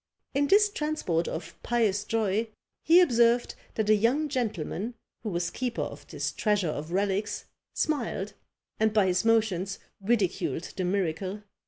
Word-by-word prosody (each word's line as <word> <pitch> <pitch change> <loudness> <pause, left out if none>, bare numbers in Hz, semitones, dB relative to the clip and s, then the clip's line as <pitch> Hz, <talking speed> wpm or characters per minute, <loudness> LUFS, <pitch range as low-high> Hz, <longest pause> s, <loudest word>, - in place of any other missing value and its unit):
In 285 +1 +2
this 415 +4 +6
transport 300 - -1
of 160 - -5
pious 215 -4 +1
joy, 220 0 0 0.3
he 340 +3 +7
observed 240 -6 +3 0.2
that 220 -2 0
a 215 - +6
young 245 +9 +2
gentleman, 225 - -2 0.3
who 220 - -3
was 175 -2 -1
keeper 250 -2 -2
of - - -8
this - - -3
treasure 205 -6 +1
of 155 +2 -4
relics, 200 +2 -1 0.3
smiled, 240 -9 -1 0.5
and 220 0 +3
by 210 -3 +4
his 185 +1 +2
motions 210 -4 +2 0.2
ridiculed 195 - 0
the 185 - -1
miracle. 190 +2 -1
215 Hz, 145 wpm, -28 LUFS, 190-240 Hz, 0.5 s, he